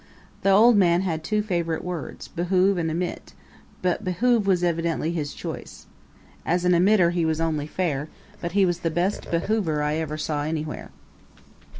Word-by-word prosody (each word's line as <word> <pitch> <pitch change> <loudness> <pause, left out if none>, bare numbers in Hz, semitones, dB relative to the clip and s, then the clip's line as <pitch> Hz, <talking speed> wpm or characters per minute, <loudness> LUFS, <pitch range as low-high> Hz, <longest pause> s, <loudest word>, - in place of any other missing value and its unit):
The 195 - +2
old 215 +4 +6
man 175 -2 +4
had 165 -4 -2
two 210 +5 0
favorite 170 -5 -2
words 175 -6 -6
behoove 185 +2 +1
and 165 -1 -1
emit 175 +3 -4 0.5
but 180 +3 0
behoove 215 +3 +1
was 180 -2 +2
evidently 165 -1 0
his 150 -4 -3
choice. - - -7 0.6
As 175 +1 0
an 180 - +4
emitter 180 0 +4
he 175 -1 0
was 160 0 0
only 155 -3 -1
fair, 155 -4 -2 0.3
but 170 -1 -4
he 200 -1 +4
was 175 -1 0
the 165 - -1
best 175 +5 -1
behoover 170 -3 0
I 150 +1 0
ever 155 -1 -3
saw 150 -1 -2
anywhere. 155 0 -4
170 Hz, 170 wpm, -24 LUFS, 160-185 Hz, 0.6 s, old